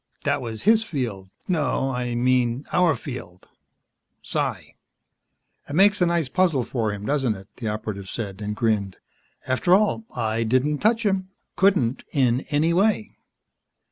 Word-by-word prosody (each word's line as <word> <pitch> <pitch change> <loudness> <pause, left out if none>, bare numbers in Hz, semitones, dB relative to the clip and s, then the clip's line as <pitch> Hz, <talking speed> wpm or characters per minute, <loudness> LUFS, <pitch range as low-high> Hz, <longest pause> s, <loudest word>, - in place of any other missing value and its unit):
"That - - 0
was 115 -3 -6
his 220 +2 +5
field. 120 - -4 0.2
No, 150 -6 0
I 125 -1 -2
mean 125 +1 +1
our 175 -4 +4
field. 120 - -9 0.8
Psi." - - -3 1.0
"It 145 - -4
makes 205 +2 +5
a 175 - +5
nice 170 -4 +1
puzzle 165 -4 +2
for 115 -3 -2
him, 105 0 -6
doesn't 135 -5 +1
it?" 95 0 -12
the 115 - -4
Operative 105 -2 -4
said, 100 -3 -5
and 105 0 -3
grinned. 105 -5 0 0.5
"After 135 +8 +3
all, 215 +2 +1
I 115 -1 -1
didn't 130 +6 +1
touch 225 +2 +2
him 190 -2 0 0.3
couldn't, 180 -11 +2
in 130 -2 +1
any 155 +3 +2
way. 210 +4 +1
130 Hz, 145 wpm, -24 LUFS, 110-175 Hz, 1.0 s, his